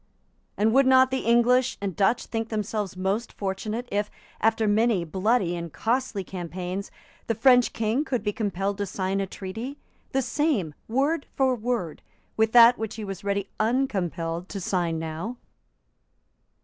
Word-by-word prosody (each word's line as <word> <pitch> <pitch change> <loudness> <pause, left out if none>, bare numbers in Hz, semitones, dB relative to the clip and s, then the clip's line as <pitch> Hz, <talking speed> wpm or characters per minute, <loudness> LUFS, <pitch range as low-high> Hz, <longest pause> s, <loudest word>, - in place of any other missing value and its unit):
And 220 +2 +3
would 270 0 +5
not 260 0 +6
the 265 - 0
English 245 +2 +4
and 195 -4 -3
Dutch 200 +7 +2
think 225 -1 -3
themselves 210 -3 -3
most 195 +5 -1
fortunate 210 +5 -4
if, 205 +1 0 0.3
after 225 0 +2
many 210 -3 +2
bloody 190 +1 +1
and 170 -1 -5
costly 230 - -1
campaigns, 180 +2 -5 0.4
the 230 - 0
French 250 +2 +5
King 225 +5 0
could 250 -7 -2
be 210 -1 -1
compelled 200 -2 -2
to 200 - -1
sign 190 +1 -1
a 195 - -2
treaty, 220 +10 -6 0.3
the 270 0 +1
same, 250 - 0
word 280 +6 0
for 265 -1 +3
word, 230 -8 -3 0.3
with 220 0 +2
that 240 0 +8
which 220 -1 -4
he 220 - -6
was 195 -1 -6
ready 200 -1 -2
uncompelled 185 -8 -1
to 200 - -5
sign 175 -3 -1
now? 165 +9 -5
215 Hz, 155 wpm, -26 LUFS, 190-240 Hz, 0.4 s, that